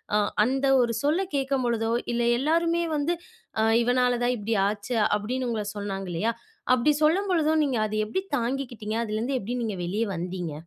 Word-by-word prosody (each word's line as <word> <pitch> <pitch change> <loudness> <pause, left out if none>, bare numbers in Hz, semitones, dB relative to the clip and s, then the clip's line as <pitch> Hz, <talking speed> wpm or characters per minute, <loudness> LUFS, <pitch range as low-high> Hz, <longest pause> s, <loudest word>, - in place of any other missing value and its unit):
அ - - +4 0.2
அந்த 265 +4 +1
ஒரு 235 -1 +1
சொல்ல 320 +7 +2
கேட்கும்பொழுதோ 250 -5 0 0.2
இல்லை 235 0 +1
எல்லாருமே 335 +4 +2
வந்து 300 +4 0 0.7
"இவனால 245 0 +2
தான் 250 +1 +2
இப்டி 220 +1 -2
ஆச்சு" 205 +4 -3 0.2
அப்டின்னு 245 +4 -3
உங்கள 215 -2 -2
சொன்னாங்க 195 -2 -4
இல்லையா 220 +8 0 0.4
அப்டி 255 +5 +3
சொல்லும்பொழுதும் 320 -2 +3
நீங்க 260 -5 0
அத 215 - -4
எப்டி 300 - -2 0.2
தாங்கிக்கிட்டீங்க? 235 -3 -3
அதுலருந்து 225 +5 -1
எப்டி 235 +5 -4
நீங்க 215 -4 -3
வெளிய 200 +6 -1
வந்தீங்க? 175 -1 -4
240 Hz, 150 wpm, -26 LUFS, 215-275 Hz, 0.7 s, அ